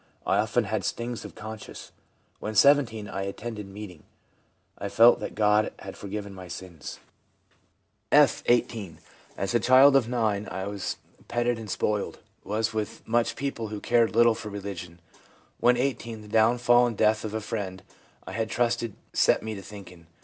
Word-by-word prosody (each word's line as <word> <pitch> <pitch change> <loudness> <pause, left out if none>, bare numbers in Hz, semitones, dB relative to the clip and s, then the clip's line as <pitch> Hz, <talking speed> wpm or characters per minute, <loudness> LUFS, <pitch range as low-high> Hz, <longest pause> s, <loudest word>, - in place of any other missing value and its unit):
I 100 - +2
often 110 +3 +1
had 110 +1 -2
stings 120 0 -3
of - - -10
conscience. 110 0 -9 0.5
(When 110 0 -5
17) 115 -3 +4
I 95 - -4
attended 105 +2 -5
meeting; 95 -4 -9 0.8
I 100 - -3
felt 115 +4 +6
that - - -6
God 105 0 +3
had - - -9
forgiven 100 0 -6
my 95 -1 -10
sins/ 85 -6 -8 1.1
F., - - +5
18. 110 -7 +1 0.2
' - - -28
As 95 0 -2
a 120 - +4
child 130 +4 +6
of 125 -4 +3
9, 110 -4 0
I 95 +1 -4
was 100 -1 -4 0.3
petted 120 0 0
and 110 -2 -8
spoiled; 105 +2 -1 0.3
was 110 +3 -1 0.3
much 115 +1 +2
with - - -6
people 135 -5 -3
who 105 0 -5
cared 115 0 +2
little 120 0 +6
for 110 - -7
religion. 95 -4 -7 0.6
When 125 0 +4
18 120 -4 -2
the - - -12
downfall 120 +3 +4
and 115 -3 -4
death 110 0 +3
of 110 0 -4
a - - 0
friend 100 -4 -5 0.4
I - - -7
had 110 +3 -2
trusted 115 -3 0 0.2
set - - +3
me 110 0 -4
to 100 - -7
thinking. 90 -4 -12
110 Hz, 170 wpm, -27 LUFS, 100-120 Hz, 1.1 s, felt